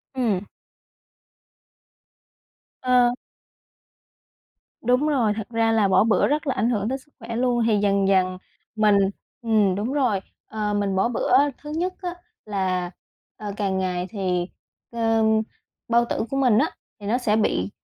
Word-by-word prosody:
Ừm. 215 -7 0 2.4
Ờ. 250 -1 +3 1.7
Đúng 250 +5 +2
rồi. 245 -8 +2
Thật 220 0 -6
ra 225 -1 +1
là 220 -3 +3
bỏ 190 - +4
bữa 220 -1 +3
rất 300 +1 -1
là 265 - +1
ảnh 230 - +1
hưởng 215 -3 0
đến 265 - -1
sức 295 +3 -24
khỏe 230 -1 -6
luôn. 240 0 +1
Thì 215 -2 +3
dần 200 -1 +2
dần 185 -1 +2 0.4
mình 210 -2 +4 0.4
ừm, 215 -5 +2
đúng 220 +7 -2
rồi, 250 -9 +1 0.3
ờ, 210 -1 -2
mình 200 -1 0
bỏ 190 - +2
bữa, 245 - -1 0.2
thứ 295 - -10
nhất 365 +2 -1
á, 355 -2 -3 0.3
là, 185 -4 -1 0.5
ờ, 205 -1 -5
càng 195 -2 -1
ngày 180 -1 -2
thì, 180 -3 -1 0.4
ờ, 225 -1 +1 0.6
bao 235 0 +3
tử - - -1
của 270 - -2
mình 250 -6 +4
á, - - +2 0.3
thì 205 - -10
nó 230 +4 +2
sẽ 220 -4 +1
bị 100 - +1
220 Hz, 155 wpm, -23 LUFS, 195-245 Hz, 2.4 s, bỏ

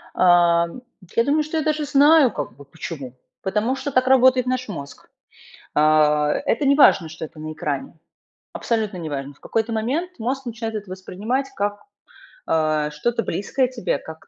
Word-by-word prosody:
Эм, 175 +3 +3 0.3
я 230 - +4
думаю, 295 +4 +2
что 310 +2 -4
я 315 - 0
даже 305 0 0
знаю 285 -2 +5
как 145 -8 -5
бы 140 - -14
почему. 140 -3 -8 0.3
Потому 210 +6 0
что 270 +2 -4
так 255 -1 +2
работает 255 -1 +5
наш 255 -1 -2
мозг. 140 -8 -9 0.7
Э, 150 - +3
это 150 - +2
неважно, 275 - +5
что 160 0 -7
это 155 - -11
на 155 0 -5
экране. 150 +1 -4 0.5
Абсолютно 220 -5 -2
неважно. 145 -4 -5
В - - -28
какой-то 225 +1 -2
момент 275 +12 -2
мозг 265 +4 -3
начинает 225 -1 -5
это 205 -3 -7
воспринимать 210 +8 -3
как, 205 -1 -2 0.7
э, 155 -2 +1
что-то 230 +10 -1
близкое 255 +6 -1
тебе, 240 - -2
как 160 0 -12
210 Hz, 160 wpm, -22 LUFS, 160-255 Hz, 0.7 s, знаю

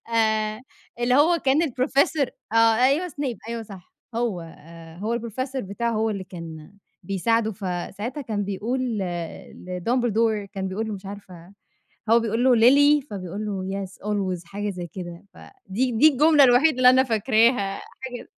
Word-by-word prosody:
آآ، 220 0 +1 0.4
اللي 245 +1 +2
هو 330 +5 +4
كان 280 +3 +2
الprofessor 275 +1 +1 0.3
آه، - - +1 0.3
أيوه 305 +7 +2
Snape، 275 -5 -4
أيوه 230 -1 -4
صح، 195 -4 -13 0.2
هو 230 -7 -1
آآ، 165 0 -13
هو 225 +5 -2
الprofessor 255 +4 -4
بتاعه، 235 +4 -3
هو 220 0 0
اللي 195 -2 -4
كان 165 -1 -10 0.3
بيساعده. 220 +4 0
فساعتها 200 +7 -5
كان 215 -6 -3
بيقول 215 +6 -2 0.2
ل 190 - -1 0.6
لDumbledore، 220 +2 0
كان 190 -1 -3
بيقول 220 +4 -3
له، 215 - -3
مش 195 0 -10
عارفة، 190 -3 -11 0.6
هو 235 +1 +6
بيقول 225 +2 -1
له: 255 -2 +5
"Lily"، 285 +4 +5
فبيقول 200 +2 -5
له 195 0 -3
"yes, - - -8 0.2
always"، 190 -4 -2
حاجة 205 +4 -4
زي 180 -2 -6
كده، 175 0 -9
فدي 255 - -4
دي 275 +8 +6
الجملة 300 +1 +5
الوحيدة 260 +3 +4
اللي 250 0 +7
أنا 260 +1 +5
فاكراها 225 -3 +2 0.2
حاج 250 -2 -7
220 Hz, 155 wpm, -24 LUFS, 195-255 Hz, 0.6 s, اللي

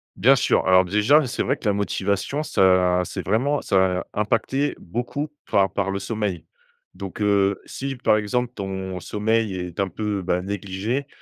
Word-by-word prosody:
Bien 135 +3 +5
sûr, 120 - +1
alors 95 0 +6
déjà, 105 - +4
c'est 125 - -3
vrai 135 +3 0
que - - -14
la 105 - +3
motivation 100 +7 -1
ça 90 -6 +3
c'est - - -6
vraiment 140 +6 +1
ça 95 -1 +1
impacter 115 +7 0
beaucoup 125 - -4 0.2
par 95 -2 +3
par 100 -1 -1
le 95 - -1
sommeil. 100 -4 -3 0.5
Donc, 100 +2 -8
heu, 100 -1 +2
si 135 0 -5
par 120 -3 +2
exemple 120 +3 -1
ton 95 -3 -5
sommeil 105 +2 0
est 90 -1 -6
un, 100 - +1
peu, 105 +2 -3
bah, 90 0 -1
négligé, 100 +7 -3
100 Hz, 165 wpm, -23 LUFS, 95-120 Hz, 0.5 s, alors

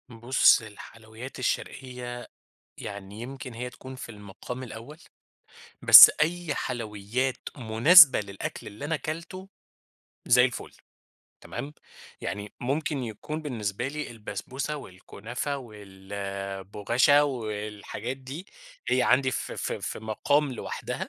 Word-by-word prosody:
بُص 120 +2 +4
الحلويات 110 +3 -11
الشرقية 125 -1 -4 0.5
يعني 100 +1 -8
يمكن 130 +1 -8
هي 125 +2 -5
تكون 130 +1 -11
في 130 - -9
المقام 105 +4 -8
الأول، 120 +5 -10 0.8
بس - - +12
أي 165 -1 0
حلويات 120 +2 -3 0.2
مناسبة 130 +7 +7
للأكل 100 -2 -6
اللي 105 +7 -8
أنا 160 +2 0
اكلته، 170 +5 -6 0.8
زي 125 +1 +6
الفل. 125 -1 -4 0.7
تمام، 145 - -7 0.5
يعني 105 0 -5
ممكن 140 +2 -2
يكون 125 +7 -6
بالنسبة 120 -4 -3
لي 150 +1 -5
البسبوسة 120 +6 -5
والكنافة 120 +4 -6
والبغاشة 100 +3 -1
والحاجات 110 -1 -5
دي، 135 +7 -9 0.4
هي 130 - +3
عندي 130 +1 +3
في - - -4
في - - -3
في - - -5
مقام 135 +6 0
لوحدها 120 - -5
120 Hz, 110 wpm, -27 LUFS, 105-135 Hz, 0.8 s, بس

